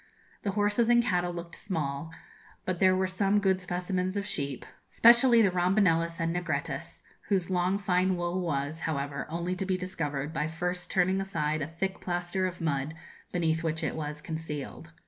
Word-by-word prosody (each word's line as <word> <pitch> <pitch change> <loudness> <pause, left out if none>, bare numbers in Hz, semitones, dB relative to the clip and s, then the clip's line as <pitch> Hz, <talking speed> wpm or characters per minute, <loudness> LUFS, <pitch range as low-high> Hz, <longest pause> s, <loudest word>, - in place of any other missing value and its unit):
The 200 - -2
horses 210 +3 +2
and 240 0 +6
cattle 180 -5 +1
looked 170 -1 -7
small, 155 -4 -3 0.5
but 185 -2 -2
there 185 0 +5
were 190 0 +2
some 195 +2 +1
good 190 -2 +2
specimens 180 +1 -1
of 200 - -2
sheep 140 -9 -3 0.2
specially 235 0 +6
the 195 - +4
rombonellis 175 -2 +2
and 165 +1 0
negrettis, 155 -2 -3 0.2
whose 190 -3 +1
long 180 +2 +2
fine 185 -1 +2
wool 175 +1 -1
was, 145 -2 -2
however, 140 -2 -3
only 170 +3 -2
to 185 - -3
be 185 -1 +1
discovered 155 -5 -3
by 155 -1 0
first 175 +2 -3
turning 185 +1 +2
aside 155 -6 -1
a 145 - -2
thick 190 +4 -3
plaster 175 +1 -1
of 180 -1 -7
mud, 150 -1 -1 0.4
beneath 165 -2 +1
which 160 0 -1
it - - -1
was 150 -1 -5
concealed. 160 -1 -5
175 Hz, 170 wpm, -29 LUFS, 160-190 Hz, 0.5 s, and